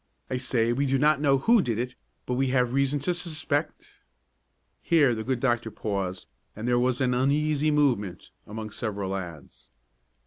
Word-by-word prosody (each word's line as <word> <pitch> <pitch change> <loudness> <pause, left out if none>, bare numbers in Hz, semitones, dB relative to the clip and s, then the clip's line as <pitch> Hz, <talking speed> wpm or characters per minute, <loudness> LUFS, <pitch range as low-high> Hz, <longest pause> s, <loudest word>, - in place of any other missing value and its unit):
I 130 - 0
say 120 -2 +1
we 140 +3 0
do 135 +1 +2
not 150 +1 +3
know 140 -2 +4
who 230 - +4
did 115 -9 -2
it, 125 +2 -3 0.3
but 125 - -2
we 135 +2 +1
have 125 -1 +1
reason 140 +1 +2
to 175 +6 0
suspect 165 -3 -3 0.4
" - - -47
Here 150 -7 +4
the 110 -1 -4
good 130 +1 -1
doctor 120 -3 0
paused 95 -4 -4 0.3
and 110 +3 -5
there 120 0 +3
was 125 +1 +1
an 125 -1 +2
uneasy 150 +4 +1
movement 120 - 0 0.2
among 110 0 -6
several 100 -3 -4
lads. 85 -7 -7
125 Hz, 175 wpm, -26 LUFS, 110-140 Hz, 0.4 s, know